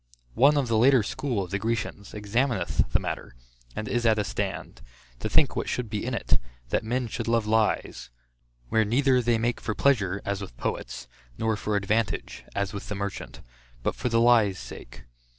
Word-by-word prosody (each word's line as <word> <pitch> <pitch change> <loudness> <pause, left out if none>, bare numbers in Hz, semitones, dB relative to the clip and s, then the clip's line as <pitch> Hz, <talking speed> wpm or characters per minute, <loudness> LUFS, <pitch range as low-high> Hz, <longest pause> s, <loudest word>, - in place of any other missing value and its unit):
One 145 +4 +5
of 140 -3 +1
the 115 -2 +2
later 130 -1 +6
school 115 -1 -2
of 90 - -9
the 100 - 0
Grecians, 110 -2 -3
examineth 115 - 0
the - - +3
matter, - - -5 0.4
and 110 - -4
is 120 +2 0
at 110 -2 +4
a 105 - +1
stand, 95 - -4 0.4
to - - -3
think - - +4
what - - -2
should 120 -4 -2
be 105 - -2
in 125 0 -2
it, - - +1 0.3
that - - +1
men 125 +3 -1
should 115 0 -4
love 115 -1 +2
lies; 110 0 0 0.6
where 110 - +3
neither 130 +4 +3
they 120 -1 +2
make 120 +2 -1
for 110 - -2
pleasure, 100 -9 +2
as 100 0 -2
with 90 -12 -8
poets, - - -4 0.3
nor 110 -1 +1
for 105 0 -2
advantage, 105 +2 -1
as 100 -1 -1
with 100 - -6
the 105 - -2
merchant; 100 -10 -5 0.4
but - - +1
for 125 - -2
the 115 0 +3
lie's 115 -5 +5
sake. - - -10
110 Hz, 190 wpm, -27 LUFS, 100-120 Hz, 0.6 s, later